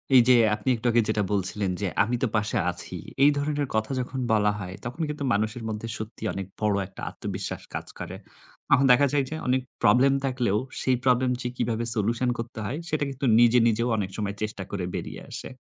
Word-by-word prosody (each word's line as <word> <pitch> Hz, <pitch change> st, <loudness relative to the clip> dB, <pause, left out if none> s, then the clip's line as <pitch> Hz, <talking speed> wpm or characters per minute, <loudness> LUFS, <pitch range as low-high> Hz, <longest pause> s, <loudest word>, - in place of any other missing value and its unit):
এই 125 Hz, -, +10 dB
যে 125 Hz, -, +8 dB, 0.2 s
আপনি 105 Hz, +5 st, -3 dB
একটু 115 Hz, +1 st, -10 dB
আগে 120 Hz, 0 st, +4 dB
যেটা 105 Hz, -1 st, +1 dB
বলছিলেন 95 Hz, 0 st, 0 dB
যে, 100 Hz, -, 0 dB, 0.2 s
"আমি 120 Hz, +4 st, -1 dB
তো -, -, +3 dB
পাশে 110 Hz, +2 st, 0 dB
আছি।" -, -, -6 dB, 0.3 s
এই 145 Hz, -, +8 dB
ধরনের 145 Hz, -1 st, -1 dB
কথা 110 Hz, +3 st, 0 dB
যখন 125 Hz, +1 st, -4 dB
বলা 105 Hz, -1 st, +3 dB
হয়, 95 Hz, -1 st, -6 dB
তখন 125 Hz, +7 st, -5 dB
কিন্তু 150 Hz, -1 st, -4 dB
মানুষের 110 Hz, +3 st, -1 dB
মধ্যে 110 Hz, +1 st, -4 dB
সত্যি 110 Hz, 0 st, -8 dB
অনেক 95 Hz, -1 st, -4 dB, 0.2 s
বড় 105 Hz, -1 st, +2 dB
একটা 95 Hz, -, -12 dB
আত্মবিশ্বাস -, -, -5 dB
কাজ -, -, -4 dB
করে। -, -, -6 dB, 0.5 s
তখন 135 Hz, -, +5 dB
দেখা 140 Hz, +3 st, +6 dB
যায় 140 Hz, -2 st, +3 dB
যে, 160 Hz, -, -4 dB
অনেক 130 Hz, +1 st, +2 dB, 0.2 s
প্রবলেম 135 Hz, +2 st, +5 dB
থাকলেও, 125 Hz, -6 st, +1 dB, 0.2 s
সেই 130 Hz, -1 st, +2 dB
প্রবলেম 125 Hz, 0 st, +3 dB
যে -, -, -2 dB
কীভাবে 115 Hz, -1 st, -1 dB
সলিউশন 115 Hz, +4 st, +1 dB
করতে 115 Hz, 0 st, -6 dB
হয়, 135 Hz, +9 st, -3 dB
সেটা 155 Hz, -1 st, 0 dB
কিন্তু 135 Hz, +1 st, -4 dB
নিজে, 120 Hz, +1 st, +6 dB
নিজেও 115 Hz, +2 st, +1 dB
অনেক 95 Hz, -3 st, -2 dB
সময় 100 Hz, -1 st, -2 dB
চেষ্টা 105 Hz, -2 st, -3 dB
করে 95 Hz, -3 st, -2 dB
বেরিয়ে -, -, -5 dB
আসে। -, -, -6 dB
115 Hz, 205 wpm, -26 LUFS, 105-130 Hz, 0.5 s, এই